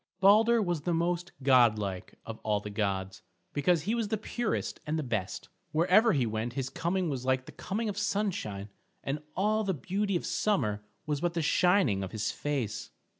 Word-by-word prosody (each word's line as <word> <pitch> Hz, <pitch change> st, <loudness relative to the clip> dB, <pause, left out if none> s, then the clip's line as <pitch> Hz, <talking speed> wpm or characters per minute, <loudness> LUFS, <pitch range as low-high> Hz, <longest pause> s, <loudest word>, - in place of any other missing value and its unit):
Balder 220 Hz, +4 st, +6 dB
was 175 Hz, -5 st, -1 dB
the 170 Hz, +2 st, 0 dB
most 175 Hz, +2 st, -1 dB
godlike 110 Hz, -8 st, +3 dB
of 115 Hz, -1 st, -7 dB
all 105 Hz, -1 st, 0 dB
the 105 Hz, 0 st, -7 dB
gods, 95 Hz, -2 st, -2 dB, 0.3 s
because 155 Hz, +2 st, +2 dB
he 215 Hz, -, 0 dB
was 230 Hz, -2 st, 0 dB
the 220 Hz, -, -1 dB
purest 235 Hz, +2 st, -2 dB
and 155 Hz, +1 st, 0 dB
the 155 Hz, -, -1 dB
best. 110 Hz, -7 st, -3 dB, 0.3 s
Wherever 185 Hz, +8 st, +5 dB
he 135 Hz, -5 st, +2 dB
went 110 Hz, +2 st, -2 dB
his 135 Hz, 0 st, -3 dB
coming 180 Hz, +4 st, 0 dB
was 135 Hz, -5 st, -3 dB
like 130 Hz, 0 st, +1 dB
the -, -, -10 dB
coming 220 Hz, +4 st, -3 dB
of 205 Hz, -1 st, -2 dB
sunshine, 185 Hz, -, -2 dB, 0.3 s
and 145 Hz, +2 st, -2 dB
all 215 Hz, +3 st, +2 dB
the 190 Hz, -3 st, 0 dB
beauty 195 Hz, +6 st, -1 dB
of 175 Hz, -, -1 dB
summer 105 Hz, -, 0 dB, 0.2 s
was 150 Hz, -2 st, -1 dB
but 175 Hz, 0 st, 0 dB
the 165 Hz, -, 0 dB
shining 175 Hz, -, +3 dB
of 95 Hz, -, -5 dB
his 105 Hz, -1 st, -1 dB
face. 135 Hz, -8 st, -3 dB
155 Hz, 185 wpm, -30 LUFS, -, 0.3 s, Balder